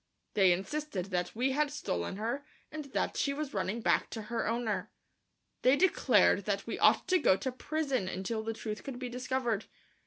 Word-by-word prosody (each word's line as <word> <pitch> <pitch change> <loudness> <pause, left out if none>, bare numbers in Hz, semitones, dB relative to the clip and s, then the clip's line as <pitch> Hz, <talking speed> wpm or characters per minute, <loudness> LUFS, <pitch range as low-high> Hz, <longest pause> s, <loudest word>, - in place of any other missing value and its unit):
They 190 -3 +5
insisted 195 +1 -2
that 180 +1 -1
we 255 +4 +1
had 295 +2 +1
stolen 185 - -3
her 235 +7 -2 0.3
and 310 -1 -5
that 275 - -2
she 280 - +1
was 295 -1 -4
running 205 +3 -1
back - - +2
to 220 - -5
her 230 - 0
owner. 230 -1 -1 0.7
They 255 +2 +5
declared 370 +5 +4
that - - -1
we - - -4
ought - - +5
to 370 -1 +5
go 190 - +4
to 260 - -2
prison 275 -5 -1
until 190 +4 -2
the 225 +1 -3
truth 215 -1 -5
could 270 -3 -6
be 250 0 -4
discovered. 245 -3 -1
240 Hz, 185 wpm, -32 LUFS, 210-280 Hz, 0.7 s, They